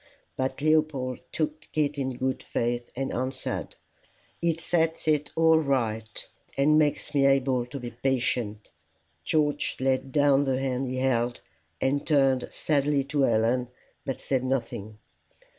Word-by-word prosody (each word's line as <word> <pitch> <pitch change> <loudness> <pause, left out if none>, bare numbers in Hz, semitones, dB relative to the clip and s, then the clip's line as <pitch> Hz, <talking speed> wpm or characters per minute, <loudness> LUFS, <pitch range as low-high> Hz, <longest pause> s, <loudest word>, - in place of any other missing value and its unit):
But 130 +2 -2
Leopold 155 -5 +1
took 155 0 -3
it 150 -1 +1
in 130 -3 -3
good 130 +1 -1
faith, 120 0 -2
and 135 +1 -2
answered, 130 +1 -3 0.7
"It 165 -1 +1
sets 165 -1 0
it 150 -1 +2
all 160 0 +5
right, 115 -7 -1 0.3
and 150 +3 +5
makes 150 0 0
me 140 -1 +4
able 130 -3 +2
to 140 +3 -6
be 120 -1 -6
patient." 120 -4 -1 0.5
George 150 -2 0
laid 130 0 0
down 145 0 +4
the 130 -1 +1
hand 135 0 -1
he 130 +1 -3
held, 120 -2 0 0.4
and 140 +2 +1
turned 135 -4 +3
sadly 145 -2 +1
to 145 - +2
Helen, 120 0 +2 0.4
but 135 -2 -4
said 130 -2 -1
nothing. 120 -5 -3
135 Hz, 140 wpm, -27 LUFS, 125-145 Hz, 0.7 s, all